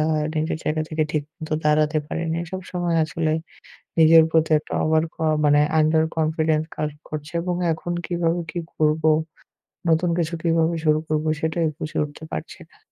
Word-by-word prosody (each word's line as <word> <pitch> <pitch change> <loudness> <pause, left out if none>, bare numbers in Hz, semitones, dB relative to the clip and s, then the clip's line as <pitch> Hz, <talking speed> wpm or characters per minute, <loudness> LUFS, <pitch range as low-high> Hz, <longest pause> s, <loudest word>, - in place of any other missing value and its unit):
আ - - +3 0.3
নিজের 155 0 -1
জায়গা 155 +1 0
থেকে 155 0 0
ঠিক 150 - 0 0.2
মত 160 -2 -7 0.2
দাঁড়াতে 150 +1 +3
পারিনি। 165 0 -2
সবসময় 180 -2 -2
আসলে 155 +1 -1 0.7
নিজের 160 0 +8
প্রতি 160 0 +2
একটা 155 - -8
ওভার 155 0 +3
ক - - -38 0.3
মানে 145 0 +5 0.2
আন্ডার 155 +1 +4
কনফিডেন্স 155 0 +1
কাজ 150 0 -1 0.2
করছে 155 +1 -6
এবং 180 0 -1 0.2
এখন 170 +2 -4
কিভাবে 175 -1 0
কি - - -5 0.2
করবো? 155 +1 +2 0.8
নতুন 165 +2 +3
কিছু 170 -1 -1
কিভাবে 165 0 +2
শুরু 155 0 +4
করবো? 155 0 0
সেটাই 160 +1 0
বুঝে 155 - -5
উঠতে 145 +1 -9
পারছি 80 - -6
না। - - -25
160 Hz, 165 wpm, -23 LUFS, 155-165 Hz, 0.8 s, নিজের